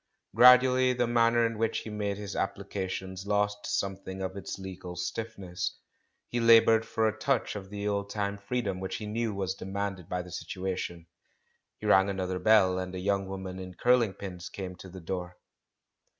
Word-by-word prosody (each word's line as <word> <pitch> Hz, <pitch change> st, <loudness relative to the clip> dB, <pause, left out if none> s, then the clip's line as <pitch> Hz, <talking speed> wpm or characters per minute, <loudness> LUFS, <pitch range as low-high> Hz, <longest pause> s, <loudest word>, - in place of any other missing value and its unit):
Gradually 125 Hz, +1 st, +7 dB
the 125 Hz, 0 st, +1 dB
manner 115 Hz, 0 st, +3 dB
in 115 Hz, -1 st, -2 dB
which 115 Hz, 0 st, 0 dB
he 110 Hz, -, -7 dB
made 100 Hz, -1 st, -2 dB
his 100 Hz, -1 st, -6 dB
applications 95 Hz, -1 st, -4 dB
lost 105 Hz, 0 st, 0 dB
something 95 Hz, -1 st, -3 dB
of 95 Hz, 0 st, -4 dB
its 100 Hz, 0 st, -5 dB
legal 95 Hz, -2 st, -7 dB
stiffness; 95 Hz, -1 st, -4 dB, 0.5 s
he 120 Hz, -, -2 dB
laboured 115 Hz, -1 st, +6 dB
for 110 Hz, 0 st, +1 dB
a 110 Hz, -, -1 dB
touch 125 Hz, +1 st, 0 dB
of 95 Hz, -2 st, -7 dB
the 105 Hz, 0 st, -4 dB
old 100 Hz, -1 st, -1 dB
time 100 Hz, -1 st, -2 dB
freedom 100 Hz, -3 st, -2 dB
which 95 Hz, 0 st, -4 dB
he 110 Hz, -, -5 dB
knew 110 Hz, +2 st, -1 dB
was 95 Hz, -2 st, -2 dB
demanded 95 Hz, -2 st, -4 dB
by 90 Hz, 0 st, -2 dB
the 90 Hz, -, -12 dB
situation. 90 Hz, -1 st, -4 dB, 0.7 s
He -, -, -9 dB
rang 95 Hz, +2 st, +5 dB
another 95 Hz, -1 st, -2 dB
bell, 95 Hz, -4 st, +5 dB
and 95 Hz, 0 st, -5 dB
a -, -, -3 dB
young 100 Hz, +1 st, 0 dB
woman 95 Hz, -1 st, -6 dB
in 90 Hz, -1 st, -8 dB
curling 120 Hz, -3 st, +3 dB
pins 90 Hz, -3 st, -7 dB
came 95 Hz, -2 st, -6 dB
to 95 Hz, -, -11 dB
the 95 Hz, 0 st, -10 dB
door. 90 Hz, +1 st, -5 dB
100 Hz, 180 wpm, -29 LUFS, 95-110 Hz, 0.7 s, Gradually